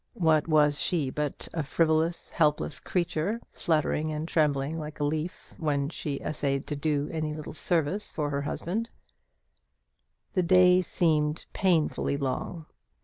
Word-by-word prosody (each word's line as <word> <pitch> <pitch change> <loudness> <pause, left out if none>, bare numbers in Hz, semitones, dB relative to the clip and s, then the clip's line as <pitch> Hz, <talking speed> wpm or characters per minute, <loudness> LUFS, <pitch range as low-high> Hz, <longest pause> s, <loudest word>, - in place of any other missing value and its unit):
What 160 -3 +3
was 150 -2 +4
she 155 -8 +1
but 150 0 -3
a 165 - -1
frivolous, 160 +3 +1
helpless 150 -2 +1
creature, 180 +4 -1
fluttering 155 -1 0
and 155 +1 -3
trembling 150 -1 +1
like 150 -1 -7
a - - 0
leaf 155 +4 -3
when 145 -3 0
she 145 -3 -4
essayed 140 -2 -1
to 150 - -1
do 145 0 0
any 155 -1 -2
little 155 -1 -7
service 170 +4 0
for 150 -2 -2
the 140 - -1
invalid? 220 +7 -3 1.4
The 185 - +2
day 180 +1 +6
seemed 155 -3 +1
painfully 165 -6 +1
long. 140 +4 -3
155 Hz, 140 wpm, -28 LUFS, 150-170 Hz, 1.4 s, day